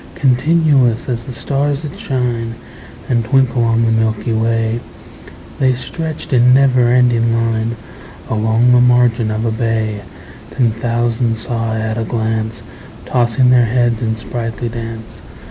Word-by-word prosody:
Continuous 135 -2 +2
as 120 -2 -3
the 130 - -7
stars 140 +4 -2
that 150 - -6
shine 120 -3 -2 0.5
And 120 -2 +1
twinkle 130 0 +2
on 115 0 +2
the 115 - +1
milky 110 0 0
way, 115 +1 0 0.8
The 130 -2 +2
stretched 155 +3 -5
in 125 0 +5
never 130 -3 +4
ending 120 -2 +3
line 115 0 -1 0.5
Along 110 +3 +2
the 125 0 +5
margin 120 -2 +3
of 110 +1 -2
a 115 - 0
bay: 110 -2 -2 0.6
Ten 120 -3 +3
thousand 115 0 -1
saw 115 -1 -3
I 110 - -2
at 110 +1 -2
a - - -1
glance, 110 -1 -3 0.4
Tossing 125 0 +2
their 125 -1 +5
heads 120 0 0
in 110 -1 -1
sprightly 115 0 -5
dance. 115 -1 -8
115 Hz, 145 wpm, -16 LUFS, 115-125 Hz, 0.8 s, in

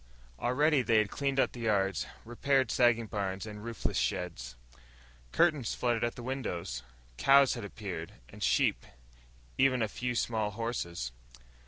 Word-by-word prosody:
Already 145 - +3
they 115 -2 +3
had 110 -1 +2
cleaned 140 -1 -1
up - - +3
the 120 - -10
yards, 100 -5 +1 0.2
repaired 130 +1 +1
sagging 120 -2 +3
barns 100 -1 -3
and 105 -1 -8
roofless 115 - -2
sheds. 65 -1 -3 0.8
Curtains 150 - +2
fluttered 120 -2 0
at 120 - -1
the 120 - -8
windows. 95 - -3 0.4
Cows 140 -1 +6
had 120 - -5
appeared, 95 -5 -6
and - - -13
sheep, - - +2 0.8
even 130 -3 +4
a - - +1
few 125 +4 -3
horses. 105 - -2
115 Hz, 140 wpm, -31 LUFS, 95-125 Hz, 0.8 s, Cows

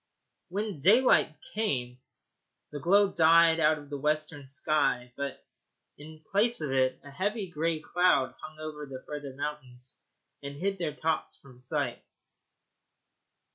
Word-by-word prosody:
When 205 -2 -3
daylight 200 - +4 0.2
came 125 - -2 0.7
the 145 - -5
glow 195 +6 +4
died 165 0 +5
out 155 0 +4
of 145 -1 -13
the 145 - -4
western 150 -1 -2
sky, 130 -3 0
but 140 -1 -5 0.5
in 155 +1 -13
place 225 +4 +3
of 150 -4 -3
it 130 -1 +1
a 145 - -11
heavy 195 +4 -2
gray 165 0 -1
cloud 140 -8 +2
hung 155 0 -10
over 155 -1 -7
the 130 -1 -9
further 145 -3 -7
mountains 130 -4 -7 0.4
and 140 0 -7
hid 195 +4 -2
their 155 -4 -2
tops 160 +1 -2
from 130 -3 -17
sight. 125 - -3
150 Hz, 135 wpm, -29 LUFS, 140-170 Hz, 0.7 s, died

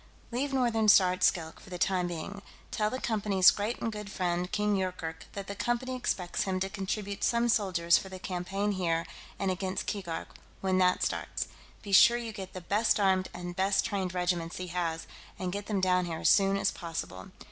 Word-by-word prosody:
"Leave 270 +4 -1
Northern 235 -5 +2
Star 185 -3 +7
at 185 - -7
Skilk, 160 -3 +1
for - - -15
the 180 - -5
time 180 0 +1
being. 175 +4 -6 0.3
Tell 210 -1 0
the 255 - -4
Company's 205 -5 +4
great 210 +3 -3
and 225 - -2
good 210 -2 -7
friend 180 -1 -1
King 210 0 +1
Yoorkerk 170 -5 -4
that 200 -1 -5
the 200 - -5
Company 240 +4 -1
expects 185 -8 -2
him 190 -1 -1
to 195 0 -1
contribute 200 +1 -3
some 235 0 +2
soldiers 185 -6 +3
for 190 - -9
the 190 - -7
campaign 190 +3 -2
here 170 -4 0 0.3
and 195 -1 0
against 185 +1 -3
Keegark, 180 -6 -4 0.3
when 185 -1 +1
that 180 0 +3
starts; - - -2 0.3
be 205 - -7
sure 235 +4 +7
you 235 -2 -5
get 190 -3 -8
the 185 - -6
best 210 +5 +2
armed 190 -2 +2
and 175 0 -7
best 195 +1 +2
trained 190 -3 -2
regiments 175 -2 -1
he 180 -1 -5
has, 165 -2 -2 0.3
and 185 -1 -3
get 205 0 -5
them 205 -3 0
down 180 -1 +2
here 165 -2 -4
as - - +4
soon 195 -1 +4
as - - +1
possible. 165 - -6
190 Hz, 200 wpm, -30 LUFS, 180-205 Hz, 0.3 s, Star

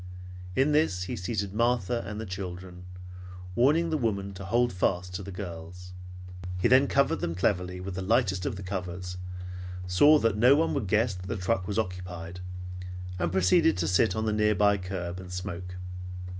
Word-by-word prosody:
In 135 +6 +3
this 145 - +2
he 110 +7 -4
seated 100 -1 -3
Martha 120 0 +1
and 105 +1 -5
the 110 - -4
children, 90 -1 -7 0.7
warning 150 - +3
the 155 - +1
woman 100 -5 -1
to 95 +1 -8
hold 120 +4 +2
fast 90 0 0
to 90 - -4
the 100 +1 -7
girls. 90 -1 -8 0.7
Then 130 +3 +7
he 140 - 0
covered 140 0 +3
them 85 - -2
cleverly 90 0 0
with 95 +1 -5
the 95 - -4
lightest 95 -2 +2
of - - -2
the 95 - -7
covers, 90 -1 -4 0.7
saw 145 +13 +6
that 115 -7 +2
no 125 +5 +7
one 165 +2 +2
would 105 - -1
guess 110 +3 +2
that 90 0 -8
the 115 - -2
truck 95 0 0
was 100 0 -2
occupied, 90 -3 -4 0.8
and 85 -1 0
proceeded 95 - +4
to 85 -2 0
sit 95 +6 +3
on 110 0 -1
the 110 - +1
nearby 105 -1 +4
curb 90 -1 -4
and 90 -1 -9
smoke. 90 -1 -5
95 Hz, 180 wpm, -28 LUFS, 90-115 Hz, 0.8 s, Then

